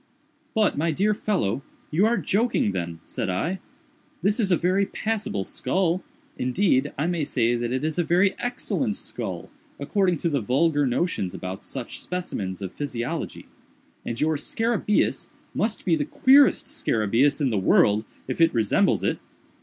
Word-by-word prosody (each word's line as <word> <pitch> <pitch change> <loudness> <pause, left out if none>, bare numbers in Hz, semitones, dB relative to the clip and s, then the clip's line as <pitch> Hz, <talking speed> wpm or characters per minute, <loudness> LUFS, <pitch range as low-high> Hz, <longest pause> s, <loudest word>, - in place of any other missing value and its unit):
"But, 215 -8 +2
my 165 +2 +1
dear 200 +7 +2
fellow, 185 - -1 0.3
you 185 +8 +3
are 235 +1 +2
joking 220 - +1
then," 85 -3 -4
said - - -3
I, 165 - -1 0.6
"this 205 +5 +2
is 205 -4 +2
a 175 - +5
very 185 +3 +2
passable 210 - -2
skull—indeed, 180 - -1
I 145 - 0
may 170 -2 0
say 120 -4 +1
that 120 0 -1
it 130 +3 -1
is 155 +2 -1
a - - +3
very 180 +4 +3
excellent 245 -2 -1
skull, - - -5 0.3
according 190 -5 +1
to 170 - 0
the 140 -4 0
vulgar 145 +5 +2
notions 120 - -1
about 95 +1 -6
such 130 -3 -6
specimens 100 - -4
of 95 - -5
physiology—and 120 -3 -6
your 155 0 +1
scarabæus 225 +5 0 0.2
must 220 +1 -1
be 170 -4 +3
the 150 - 0
queerest 275 +1 +5
scarabæus 115 +7 +1
in 135 -4 +1
the 105 - +1
world 105 +2 +4 0.2
if - - -2
it 165 -4 +4
resembles 110 -3 +2
it. - - 0
160 Hz, 155 wpm, -25 LUFS, 120-200 Hz, 0.6 s, a